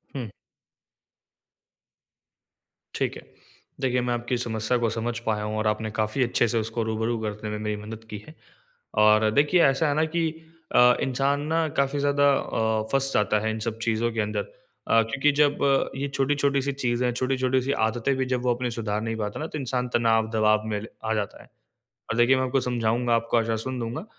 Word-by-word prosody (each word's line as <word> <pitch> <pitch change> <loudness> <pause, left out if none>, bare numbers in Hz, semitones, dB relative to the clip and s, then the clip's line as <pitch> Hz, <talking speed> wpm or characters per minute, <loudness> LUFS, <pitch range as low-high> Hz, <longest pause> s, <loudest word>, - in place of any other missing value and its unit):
हुँ। 120 -6 -5 2.6
ठीक - - -1
है। - - -10 0.6
देखिए, 125 -1 +1
मैं 120 0 -1
आपकी 120 +1 -2
समस्या 110 0 -1
को 120 -1 +1
समझ 115 +1 -2
पाया 105 -1 0
हूँ 105 0 -3
और 110 0 0
आपने 110 +1 -1
काफ़ी 110 +4 0
अच्छे 120 0 +1
से 115 - 0
उसको 115 +1 -2
रूबरू 110 +1 -1
करने 105 0 -4
में 105 - -3
मेरी 105 0 -2
मदद 110 +1 -8
की 105 - -5
है। 155 - -13 0.7
और 110 0 +5
देखिए, 150 +7 +3
ऐसा 135 +3 +3
है 145 - 0
ना 155 +1 +2
कि 165 -2 +2 0.5
अ, 125 0 +7
इंसान 135 +2 0
ना 165 0 +1
काफ़ी 140 +1 +1
ज़्यादा 145 0 +2
अ, 110 -4 0
फँस 135 0 +2
जाता 105 0 +2
है 110 +1 -1
इन 110 - -4
सब 110 0 -3
चीज़ों 115 +1 0
के 110 - -3
अंदर। 105 +1 -1
अ, - - -1
क्योंकि 145 +5 +2
जब 145 -1 +3
अ, 135 -1 +2
ये 140 - -1
छोटी-छोटी 140 0 +1
सी 140 +1 -1
चीज़ें, 125 -2 0
छोटी-छोटी 130 +1 0
सी 135 +2 -2 0.2
आदतें 120 +4 -1
भी 130 - 0
जब 125 - 0
वो 125 - +2
अपने 125 0 -2
सुधार 105 -2 -2
नहीं 115 0 -3
पाता 105 -1 -4
ना, 155 - -3
तो 150 - -6
इंसान 125 -1 -2
तनाव, 115 -1 +2
दबाव 110 0 +3
में 105 -1 -2
ल 110 - -8 0.2
आ 110 - 0
जाता 105 -2 -3
है। - - -22 0.6
और 115 - -1
देखिए, 120 +3 +5
मैं 130 - +1
आपको 130 +1 +1
समझाऊँगा, 120 -1 0
आपको 115 +1 0
आश्वासन 115 +3 -2
दूँगा 115 - -4
120 Hz, 200 wpm, -25 LUFS, 110-135 Hz, 2.6 s, अ